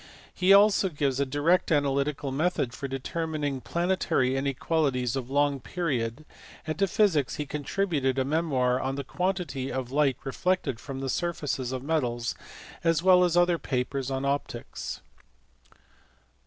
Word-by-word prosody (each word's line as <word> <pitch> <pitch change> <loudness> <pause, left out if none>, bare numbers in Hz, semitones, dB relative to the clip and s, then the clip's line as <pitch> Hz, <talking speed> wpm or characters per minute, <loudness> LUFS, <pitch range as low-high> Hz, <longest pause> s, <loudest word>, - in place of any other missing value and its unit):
He 185 +1 +3
also 200 -1 +6
gave 140 -4 -1
a 140 - +1
direct 150 +7 +2
analytical 140 -1 +1
method 140 -4 0
for 140 - -5
determining 145 0 -3
planetary 170 -7 0
inequalities 135 -2 0
of 130 -2 -4
long 145 0 +2
period; 135 -4 -2 0.4
and 155 +3 -4
to 195 - +3
physics 170 -9 +2
he 150 - -3
contributed 145 -2 -1
a 130 - +1
memoir 135 -5 +1
on 135 +1 -2
the 140 - -3
quantity 170 -4 -2
of 130 -1 -4
light 140 -3 +2
reflected 140 -3 -1
from 135 0 -6
the 135 - -3
surfaces 145 -6 -2
of 130 -1 -4
metals, 125 -7 -1 0.5
as 165 -1 +2
well 185 -1 +6
as 175 -1 +2
other 175 -1 +4
papers 130 +1 -2
on 135 0 -2
optics. 140 +1 -3
145 Hz, 140 wpm, -27 LUFS, 130-170 Hz, 0.5 s, also